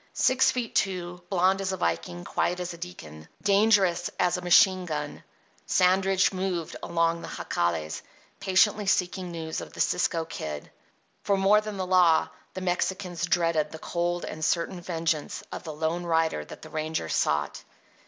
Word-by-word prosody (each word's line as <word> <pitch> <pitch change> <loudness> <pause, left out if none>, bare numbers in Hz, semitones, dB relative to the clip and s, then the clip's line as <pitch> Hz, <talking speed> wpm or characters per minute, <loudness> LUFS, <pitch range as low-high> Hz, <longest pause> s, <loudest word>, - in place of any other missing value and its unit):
Six 260 0 +3
feet 245 -3 -2
two, 180 -2 -1
blond 190 +1 +2
as 190 -1 -1
a - - -3
Viking, 85 - -2
quiet 180 +1 -1
as 175 -1 -4
a - - -10
deacon, 80 - -9 0.2
dangerous 200 -4 +3
as 180 - +2
a 180 - -3
machine 185 +1 +5
gun, 150 -2 -4 0.4
Sandridge 190 +1 +3
moved 185 -3 -3
among 170 0 0
the - - -7
Jacales, 85 -3 -2 0.4
patiently 200 +2 +3
seeking 180 -1 0
news 160 -2 -4
of - - -10
the - - -11
Cisco 170 -2 +1
Kid. 75 - -6 0.5
Far 200 -1 +2
more 200 +2 +5
than 215 -1 -6
the 185 - -2
law, 175 -4 +4 0.3
the 185 - -4
Mexicans 180 -1 -1
dreaded 165 -3 +1
the 160 - -7
cold 175 +2 -2
and 155 - -6
certain 175 +3 0
vengeance 165 -3 -2
of - - -5
the 160 - -4
lone 160 +3 -2
rider 160 - +1
that - - -11
the - - -10
ranger 155 - -2
sought. 75 -2 0
175 Hz, 165 wpm, -27 LUFS, 160-190 Hz, 0.5 s, machine